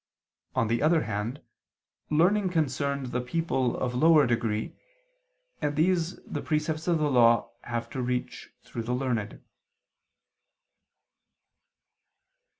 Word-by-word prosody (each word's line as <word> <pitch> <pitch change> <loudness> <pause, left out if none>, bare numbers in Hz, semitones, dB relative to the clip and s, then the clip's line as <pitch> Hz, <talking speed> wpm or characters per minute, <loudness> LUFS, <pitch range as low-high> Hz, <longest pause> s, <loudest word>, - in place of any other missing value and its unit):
On 115 - +2
the 115 +1 0
other 155 +1 +3
hand 105 +7 -4 0.7
learning 185 +6 +3
concerned 140 -5 -1
the 125 - -1
people 130 -3 -1
of 125 -1 -2
lower 155 +3 +5
degree, 115 -2 -1 0.9
and 145 0 -1
these 170 +2 +1
the - - -5
precepts 155 +1 -2
of 170 -2 +3
the 150 -2 0
Law 115 -2 +4
have 115 -1 -3
to 130 - -3
reach 125 0 -3
through 115 - -6
the 120 +2 -2
learned. 120 -5 -3
135 Hz, 115 wpm, -27 LUFS, 120-160 Hz, 0.9 s, lower